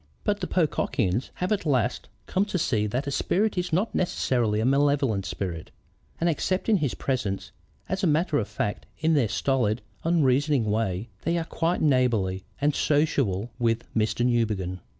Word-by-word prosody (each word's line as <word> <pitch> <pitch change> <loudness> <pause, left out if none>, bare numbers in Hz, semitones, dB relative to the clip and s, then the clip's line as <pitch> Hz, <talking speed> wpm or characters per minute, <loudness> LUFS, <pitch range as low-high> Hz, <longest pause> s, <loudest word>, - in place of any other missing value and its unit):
"But 205 -1 0
the 185 - -3
Pocockians 130 - 0
have 180 +2 -2
at 210 - +1
last 125 -6 0 0.2
come 190 - +1
to 205 - -2
see 110 -10 +1
that 125 +7 -2
a 140 - -3
spirit 205 +9 +1
is 180 -1 -2
not 190 +8 +1
necessarily 120 - +1
a 110 - +1
malevolent 135 -6 +2
spirit, 85 -5 -4 0.5
and 170 - +1
accepting 185 +6 +1
his 145 -7 -1
presence 105 -8 -2 0.4
as 190 +2 -2
a 155 - +2
fact 105 0 -3
in 160 +1 +2
their 140 -7 +3
stolid, 120 -2 0 0.2
unreasoning 145 -5 +2
way, 105 -1 -1
they 170 +1 0
are 165 - -1
quite 165 +2 -1
neighborly 115 -10 +2 0.2
and 145 +1 +2
sociable 130 -10 +1
with 115 -1 +1
Mr. 110 +2 +1
Newbegin. 105 -7 0
135 Hz, 155 wpm, -26 LUFS, 110-165 Hz, 0.5 s, their